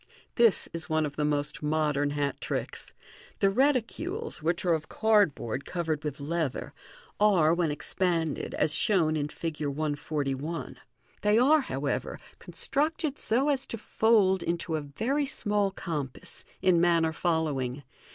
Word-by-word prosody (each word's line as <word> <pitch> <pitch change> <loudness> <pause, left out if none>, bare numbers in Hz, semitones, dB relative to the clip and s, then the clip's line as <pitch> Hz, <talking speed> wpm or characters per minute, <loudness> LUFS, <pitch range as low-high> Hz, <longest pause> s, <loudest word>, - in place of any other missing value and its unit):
— - - -30
This 230 -4 +5
is 165 0 -4
one 155 0 +2
of 145 - -5
the 150 - -1
most 150 0 -1
modern 150 -1 +1
hat 145 -1 -2
tricks. - - -3 0.5
The 195 - +3
reticules, 290 - 0
which 170 +3 -1
are 175 - +4
of 160 -1 -3
cardboard 200 - +2
covered 160 -4 -3
with 150 -2 -4
leather, 155 -1 -2 0.5
are, 185 -7 +4
when 170 -2 +1
expanded, 160 +1 -1
as 150 0 +2
shown 160 -2 +2
in 145 -1 -1
Fig. 155 +1 -5
141. 145 +1 -3 0.4
They 210 +1 +3
are, 290 +6 +5
however, 260 - -3 0.2
constructed 300 0 -1
so 260 +6 +2
as 275 -2 0
to 230 - -4
fold 210 -4 +3
into 170 -1 -2
a 155 - -1
very 235 - -1
small 205 -6 0
compass, 155 -8 -6 0.2
in 175 -3 +4
manner 165 -2 +3
following. 150 -6 -1
165 Hz, 140 wpm, -28 LUFS, 150-210 Hz, 0.5 s, This